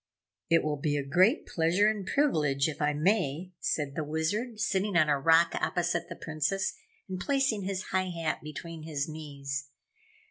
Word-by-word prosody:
"It 165 Hz, 0 st, +4 dB
will 150 Hz, -1 st, -1 dB
be 145 Hz, +1 st, 0 dB
a 140 Hz, -, -2 dB
great 185 Hz, -, +3 dB
pleasure 170 Hz, +5 st, +2 dB
and 210 Hz, -3 st, -1 dB
privilege, 150 Hz, -, +2 dB
if 155 Hz, -2 st, -5 dB
I 150 Hz, 0 st, +3 dB
may," 160 Hz, +1 st, 0 dB
said 145 Hz, -3 st, -1 dB
the 155 Hz, -, -2 dB
Wizard, 205 Hz, +10 st, -2 dB
sitting 200 Hz, -2 st, +1 dB
on 155 Hz, -3 st, +4 dB
a 145 Hz, -1 st, +2 dB
rock 165 Hz, +3 st, +5 dB
opposite 175 Hz, -1 st, -1 dB
the -, -, -6 dB
Princess 160 Hz, +5 st, -1 dB, 0.3 s
and 185 Hz, -1 st, -4 dB
placing 265 Hz, -4 st, +1 dB
his 190 Hz, -1 st, -3 dB
high 185 Hz, 0 st, +1 dB
hat 165 Hz, -3 st, -2 dB
between 160 Hz, +2 st, -7 dB
his 150 Hz, -3 st, -3 dB
knees. 140 Hz, -3 st, -5 dB
165 Hz, 170 wpm, -29 LUFS, 150-190 Hz, 0.3 s, rock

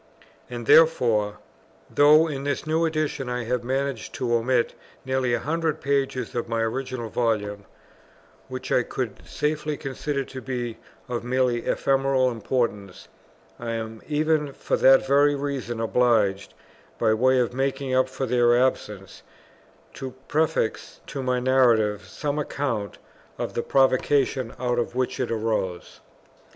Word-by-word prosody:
And 120 Hz, -1 st, -6 dB
therefore, 115 Hz, -10 st, +4 dB, 0.5 s
though 150 Hz, +3 st, +5 dB
in 140 Hz, -3 st, -4 dB
this 145 Hz, +1 st, -2 dB
new 160 Hz, +1 st, +1 dB
Edition 155 Hz, -5 st, -2 dB
I 125 Hz, 0 st, -2 dB
have 120 Hz, +1 st, -2 dB
managed 130 Hz, -4 st, -2 dB
to 120 Hz, -2 st, -1 dB
omit 120 Hz, +1 st, +1 dB, 0.3 s
nearly 130 Hz, -2 st, +1 dB
a -, -, -2 dB
hundred 160 Hz, 0 st, -1 dB
pages 135 Hz, -3 st, -1 dB
of 120 Hz, -1 st, -3 dB
my 115 Hz, 0 st, -1 dB
original 120 Hz, +1 st, -3 dB
Volume, 105 Hz, -3 st, -1 dB, 0.8 s
which -, -, -7 dB
I -, -, +4 dB
could -, -, -4 dB
safely 150 Hz, 0 st, -2 dB
consider 140 Hz, 0 st, -3 dB
to 130 Hz, 0 st, -9 dB
be 120 Hz, -3 st, -4 dB, 0.3 s
of 120 Hz, -2 st, -3 dB
merely 125 Hz, -1 st, 0 dB
ephemeral 135 Hz, -1 st, +2 dB
importance, 110 Hz, -4 st, -3 dB, 0.5 s
I 115 Hz, -1 st, -4 dB
am 110 Hz, -1 st, -5 dB
even 150 Hz, -1 st, +1 dB
for -, -, -1 dB
that 135 Hz, 0 st, +6 dB
very 145 Hz, +2 st, +4 dB
reason 135 Hz, -5 st, -3 dB
obliged, 110 Hz, -4 st, +1 dB, 0.4 s
by 110 Hz, -, +2 dB
way 130 Hz, +4 st, +3 dB
of 125 Hz, -1 st, +1 dB
making 135 Hz, 0 st, -1 dB
up 130 Hz, 0 st, +3 dB
for 130 Hz, 0 st, -3 dB
their 120 Hz, -1 st, +3 dB
absence, 105 Hz, -6 st, -2 dB, 0.7 s
to 130 Hz, -1 st, -7 dB
prefix 155 Hz, -7 st, -1 dB
to 135 Hz, -, -5 dB
my 125 Hz, -1 st, 0 dB
Narrative 115 Hz, -6 st, +3 dB
some 145 Hz, +8 st, -3 dB
account 125 Hz, -8 st, -3 dB, 0.4 s
of -, -, -4 dB
the -, -, -1 dB
provocation 130 Hz, -2 st, +2 dB
out 120 Hz, -1 st, 0 dB
of 120 Hz, -, -3 dB
which 130 Hz, 0 st, -1 dB
it 130 Hz, -, -1 dB
arose. 110 Hz, -6 st, -2 dB
130 Hz, 140 wpm, -25 LUFS, 115-140 Hz, 0.8 s, that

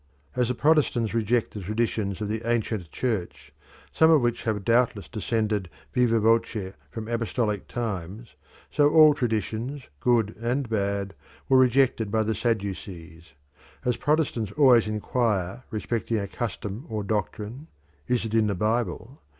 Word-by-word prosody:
As 125 Hz, -1 st, +2 dB
the 125 Hz, -, -1 dB
Protestants 140 Hz, -7 st, +2 dB
reject 115 Hz, +1 st, +1 dB
the 105 Hz, -, -6 dB
traditions 105 Hz, -1 st, -2 dB
of 105 Hz, -, -1 dB
the 110 Hz, +1 st, -2 dB
ancient 110 Hz, -6 st, -1 dB
Church, 80 Hz, -, -3 dB, 0.4 s
some 160 Hz, -, +5 dB
of 160 Hz, -2 st, +6 dB
which 120 Hz, -1 st, -1 dB
have 105 Hz, -3 st, -1 dB
doubtless 115 Hz, -3 st, +2 dB
descended 110 Hz, -4 st, -1 dB, 0.2 s
viva 120 Hz, -2 st, +3 dB
voce 110 Hz, -3 st, +1 dB, 0.2 s
from 110 Hz, -1 st, -7 dB
apostolic 115 Hz, -2 st, -1 dB
times, 110 Hz, -1 st, -5 dB, 0.4 s
so 145 Hz, -1 st, +4 dB
all 155 Hz, -1 st, +7 dB
traditions, 120 Hz, +2 st, -2 dB, 0.2 s
good 115 Hz, -, +2 dB
and 125 Hz, +3 st, -1 dB
bad, 100 Hz, -2 st, -1 dB, 0.3 s
were 130 Hz, -1 st, +5 dB
rejected 125 Hz, -3 st, +3 dB
by 110 Hz, +1 st, +1 dB
the 110 Hz, +1 st, 0 dB
Sadducees. 95 Hz, -, -4 dB, 0.5 s
As 125 Hz, -1 st, +2 dB
Protestants 145 Hz, -9 st, 0 dB
always 125 Hz, -7 st, +5 dB
inquire 110 Hz, 0 st, -1 dB
respecting 115 Hz, 0 st, -2 dB
a 100 Hz, -1 st, -2 dB
custom 110 Hz, -, -5 dB
or 110 Hz, -2 st, -3 dB
doctrine, 105 Hz, -, -3 dB, 0.4 s
"Is 125 Hz, -2 st, 0 dB
it 110 Hz, -, -5 dB
in 110 Hz, -1 st, +3 dB
the 100 Hz, -, 0 dB
Bible?" 110 Hz, -, -2 dB
110 Hz, 140 wpm, -26 LUFS, 105-120 Hz, 0.5 s, all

